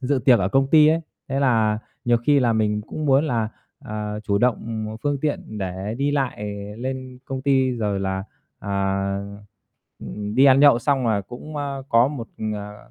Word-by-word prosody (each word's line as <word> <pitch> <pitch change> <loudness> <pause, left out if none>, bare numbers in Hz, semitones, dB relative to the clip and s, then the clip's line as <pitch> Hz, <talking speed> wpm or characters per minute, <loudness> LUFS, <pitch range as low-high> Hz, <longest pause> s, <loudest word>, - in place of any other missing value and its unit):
dự 135 +1 +1
tiệc 125 -4 +6
ở 95 - 0
công 135 +6 +2
ty 155 -1 +7
ấy. 160 +1 +3 0.3
Thế 135 +1 -1
là 110 -5 +2 0.3
nhiều 120 0 +4
khi 140 +5 +3
là 120 -3 +3
mình 105 -1 +1
cũng 155 -1 -4
muốn 135 +3 +4
là, 115 -7 0 0.3
ờ, 105 0 -5
chủ 100 -1 0
động, 125 0 +3
ừm, 110 -1 -3
một 110 +1 -6
phương 145 -2 -1
tiện 145 -8 -3
để 95 +2 -4
đi 140 +1 +1
lại 135 -7 -1 0.4
lên 130 0 -5
công 130 -1 -5
ty, 135 -2 +3
rồi 105 -5 -1
là, 95 0 -2 0.3
à, 100 0 -1 0.8
ừm, 105 +11 -6
đi 135 - +5
ăn 135 0 +6
nhậu 140 -5 +7
xong 135 -1 +1
là 105 -3 +2
cũng, 125 +9 -9
ơ, 140 -2 -3
có 115 +3 +4
một, 135 -6 -6 0.3
ờ 105 0 -9
120 Hz, 195 wpm, -23 LUFS, 105-135 Hz, 0.8 s, ty